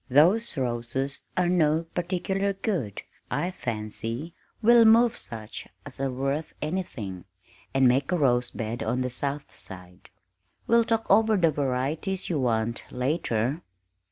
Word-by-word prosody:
Those 170 - +4
roses 130 +2 -2
are 180 -1 +3
no 165 -2 +3
particular 190 +3 -1
good, 180 - -3 0.3
I 180 - -1
fancy; 115 - -4 0.3
we'll 235 +1 +7
move 230 +1 +6
such 110 -2 -6 0.2
as 140 -2 -9
are 135 - +1
worth 135 +4 -2
anything, 125 - -4 0.5
and 135 -1 +4
make 135 +5 +2
a 180 - +2
rose 125 -4 +2
bed 115 +1 -4
on 120 +3 0
the 125 0 -1
south 140 +3 -4
side 90 -1 -11 0.6
we'll 235 0 +4
talk 225 -1 0
over 220 -1 +5
the 165 -4 +4
varieties 145 +8 -1
you 155 - 0
want, 115 -2 0
later. 125 0 -1
140 Hz, 135 wpm, -27 LUFS, 120-180 Hz, 0.6 s, we'll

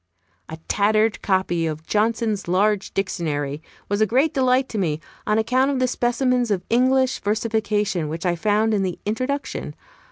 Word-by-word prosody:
A 160 - -6
tattered 215 +2 +2
copy 185 -4 0
of 155 0 -5
Johnson's 215 -2 0
large 200 +3 +1
Dictionary 150 -6 -2 0.3
was 205 +1 -1
a 215 - +4
great 265 +8 +2
delight 260 0 +2
to 220 - -3
me, 155 -5 0 0.3
on 210 0 +2
account 255 +5 +2
of 280 - 0
the 255 0 +2
specimens 245 0 +1
of 195 -4 -1
English 260 +2 +3
versification 210 -5 -1
which 165 +3 -5
I 175 -1 +2
found 215 +5 +1
in 205 - +1
the 185 -2 -2
Introduction. 255 +7 -3
215 Hz, 160 wpm, -22 LUFS, 185-245 Hz, 0.3 s, a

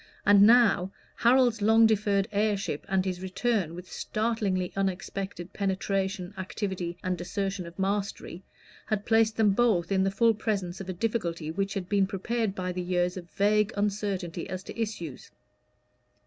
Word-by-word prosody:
And 205 0 +7
now, 220 -6 +5 0.3
Harold's 240 -2 +4
long 225 +2 +6
deferred 205 -2 +2
heirship, 205 -7 -1
and 190 -1 +1
his 185 -1 -3
return 190 -2 -1
with 180 +1 -9
startlingly 215 -5 -1
unexpected 195 -1 -3
penetration, 195 -1 -2
activity, 185 -2 -4
and 180 -1 -2
assertion 195 0 -3
of 170 - -12
mastery, 195 -2 -2 0.5
had 215 -1 -1
placed 225 -1 +3
them 215 -2 +4
both 200 -5 +2
in 190 -1 +3
the 195 - +2
full 225 +3 +3
presence 195 -4 -3
of 190 - -7
a - - -2
difficulty 175 -6 -2
which 195 +4 -2
had 190 -3 -3
been 200 -1 +2
prepared 205 +2 -2
by 185 -1 -3
the 180 0 -3
years 180 0 0
of 175 -2 -8
vague 210 +1 +2
uncertainty 200 -4 -2
as 185 0 -5
to - - -9
issues. 175 - -5
195 Hz, 155 wpm, -28 LUFS, 185-215 Hz, 0.5 s, And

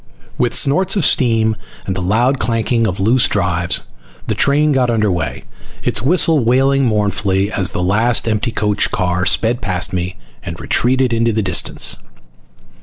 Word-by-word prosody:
With - - 0
snorts 185 +8 +3
of 190 -7 +2
steam 115 -3 +2 0.3
and 95 - -3
the 95 - -3
loud 120 +9 +1
clanking 115 +1 0
of 95 -1 -4
loose 120 +7 +2
drives, 85 -1 0 0.4
the - - -1
train 150 +2 +2
got 130 -3 +1
under 110 -3 +1
way 85 -4 -1 0.2
again, - - -27 0.4
its - - -1
whistle 160 +3 +2
wailing 135 +3 +2
mournfully 100 -2 0
as 95 -4 +1
the 90 - -3
last 110 +6 +1
empty 110 +1 -1
coach 105 -2 0
car 90 -1 -1
sped 120 +2 +1
past 95 -3 -1
me 90 0 -3 0.3
and 85 0 -8
retreated 130 0 +1
into 115 0 +1
the 110 0 -1
distance. 90 -3 -2
110 Hz, 165 wpm, -16 LUFS, 95-125 Hz, 0.4 s, snorts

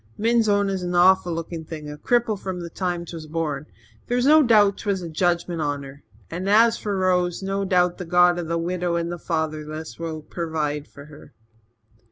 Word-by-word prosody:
Min's 230 0 +2
own 200 0 +3
is 195 -1 -2
an 180 0 -3
awful 180 0 +5
looking 165 0 -5
thing 155 -1 -8
a 150 - -6
cripple 235 +7 +1
from 190 -2 -5
the 170 -1 -7
time 175 -1 -3
'twas 165 -2 -8
born. 155 -2 -3 0.4
There's 245 +1 +1
no 310 +2 +7
doubt 210 -6 +4
'twas 195 -3 -2
a 170 - -5
jedgement 170 0 0
on 145 -1 -2
her. 140 +1 -11 0.3
As 205 +7 +3
for 205 -3 -3
Rose, 180 -1 +1
no 195 +1 -1
doubt 180 -1 +2
the 180 - -5
god 175 +1 +4
of 170 - -4
the 170 +1 -1
widow 175 +1 -1
and 170 0 -2
fatherless 155 -1 -4
will 160 -2 -5
purvide 150 -3 -3
for 140 - -13
her." 150 -1 -15
175 Hz, 190 wpm, -23 LUFS, 160-195 Hz, 0.4 s, no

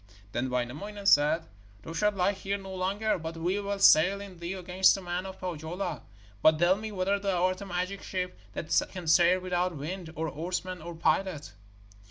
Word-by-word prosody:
Then 120 +4 -1
Wainamoinen 145 +12 -4
said: 150 -1 +4 0.4
'Thou 165 - -7
shalt 210 +5 +1
lie 190 +1 +2
here 200 0 -3
no 195 -1 -9
longer, 195 +3 0
but 165 0 -6
we 180 +5 0
will 200 0 -2
sail 195 0 +6
in 195 -3 -10
thee 170 +2 -4
against 185 0 +3
the 195 - -6
men 180 +1 -3
of 190 0 -9
Pohjola. 175 +1 -4 0.4
But 155 0 +6
tell 175 +3 +4
me 215 +1 -6
whether 195 +1 0
thou 190 -3 +1
art 185 +1 -1
a 200 - -7
magic 185 +2 -3
ship 180 -1 -3 0.2
that 155 - +1
can 180 -2 -6
sail 175 +3 +5
without 180 -2 -1
wind, 165 +3 -5
or 160 +1 -2
oarsmen, 180 +3 -4
or 170 +1 -7
pilot.' 165 - 0
180 Hz, 190 wpm, -29 LUFS, 165-195 Hz, 0.4 s, sail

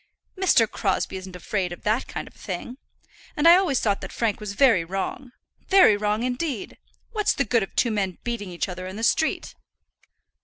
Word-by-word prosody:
"Mr. 370 - +4
Crosbie 190 -2 -1
isn't 185 0 -9
afraid 180 0 -2
of 175 - -9
that 220 +4 0
kind - - -6
of - - -15
thing. 205 +6 -6 0.6
And 300 +2 +4
I 340 - +10
always 360 -9 +2
thought 205 -3 0
that - - -7
Frank 225 -3 -1
was 210 -2 -5
very 220 -6 +4
wrong, 195 +8 -4 0.4
very 380 - +7
wrong 210 +2 -1
indeed. 255 - -3 0.3
What's 425 -3 +1
the 275 - 0
good 235 +1 +2
of 195 - -6
two 235 - +2
men 195 -4 -2
beating 235 -5 -4
each 175 +2 -3
other 185 0 -6
in 190 - -7
the 225 - -6
street?" 315 +6 +1
215 Hz, 190 wpm, -24 LUFS, 190-255 Hz, 0.6 s, I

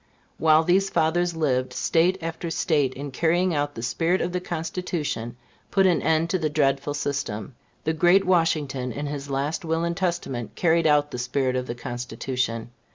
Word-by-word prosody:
While 155 0 +5
these 190 +3 +3
fathers 170 +1 +1
lived, 130 -5 0
State 170 +7 +2
after 165 +1 -4
State, 145 -5 +1
in 140 +1 -6
carrying 170 +5 +2
out 145 -1 -1
the 115 - -6
spirit 165 +10 +1
of 175 - -1
the 180 - -1
Constitution, 160 -8 -3 0.3
put 195 -1 +3
an 175 -6 +3
end 160 +2 +1
to 185 - +1
the 155 -2 0
dreadful 145 -1 +1
system. 135 -6 -3 0.3
The 160 - 0
great 175 +5 +4
Washington, 155 -8 +1
in 145 +6 -4
his 145 -1 -5
last 140 +6 -2
will 165 0 0
and 170 0 -1
testament, 170 - -3
carried 165 -1 +3
out 145 -1 +3
the 125 - -5
spirit 130 +1 0
of 125 0 -2
the 120 - -4
Constitution. 120 -1 -3
155 Hz, 175 wpm, -25 LUFS, 130-170 Hz, 0.3 s, While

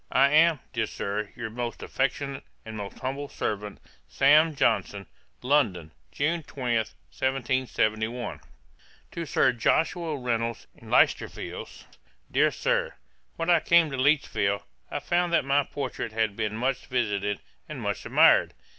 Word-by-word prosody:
'I 135 +2 +5
am, 160 0 +5
dear 115 -3 0
Sir, 100 +1 -3
'Your 115 -3 -5
most 120 +1 -5
affectionate, 135 0 -2 0.2
'And 110 0 -7
most 100 -2 -7
humble 140 +2 -4
servant, 105 -1 -4 0.3
'SAM. 150 +3 +4
JOHNSON.' 100 -7 0 0.4
'London, 110 - +1 0.2
June 165 +4 0
20, 125 -5 -2
1771.' 120 -2 -2 0.7
'To 170 - -5
SIR 130 - +3
JOSHUA 160 +6 0
REYNOLDS, 115 -2 -2
IN - - -15
LEICESTER - - +3
FIELDS. - - -8 0.5
'DEAR - - +4
SIR, - - -1 0.4
'When 165 +1 0
I 170 - +6
came 165 -1 +4
to 135 - -3
Lichfield, 130 - +1 0.3
I - - -3
found 175 0 0
that 170 - +3
my 140 +1 +3
portrait 130 -5 -5
had 110 -2 0
been 105 0 -2
much 125 +2 -1
visited, 105 -5 -1 0.3
and - - -6
much - - -3
admired. - - +4
130 Hz, 135 wpm, -27 LUFS, 110-145 Hz, 0.7 s, I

